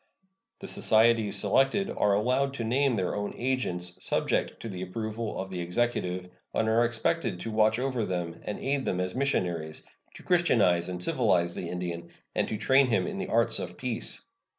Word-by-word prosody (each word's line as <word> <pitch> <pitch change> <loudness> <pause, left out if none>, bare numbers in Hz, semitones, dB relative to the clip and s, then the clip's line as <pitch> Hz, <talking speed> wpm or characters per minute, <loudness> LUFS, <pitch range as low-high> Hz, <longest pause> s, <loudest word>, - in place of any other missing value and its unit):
The 195 - -9
societies 110 - +3
selected 135 - +2
are 100 -1 +2
allowed 130 +6 +1
to 120 - -3
name 130 +3 +2
their 95 -4 -1
own 105 0 -3
agents, 90 -9 -2
subject - - 0
to - - -5
the 95 -4 -6
approval 110 +4 -4
of 95 0 -5
the 90 -1 -3
Executive, 90 -1 -1 0.2
and 110 - +1
are 115 +2 +4
expected 115 - -1
to 115 - -4
watch 110 +1 +3
over 130 -2 -1
them 85 -4 -3
and 105 - -4
aid 140 0 -1
them 90 - -1
as 90 0 -1
missionaries, 90 - -1 0.3
to - - -12
Christianize 105 - +3
and 90 -1 -3
civilize 90 -7 +2
the 85 - -5
Indian, 85 -1 -4 0.2
and - - 0
to 110 - -3
train 130 +5 +4
him 115 - +1
in 200 -2 -4
the 195 - -3
arts 115 -9 +2
of - - -6
peace. - - -3
110 Hz, 180 wpm, -28 LUFS, 90-125 Hz, 0.3 s, are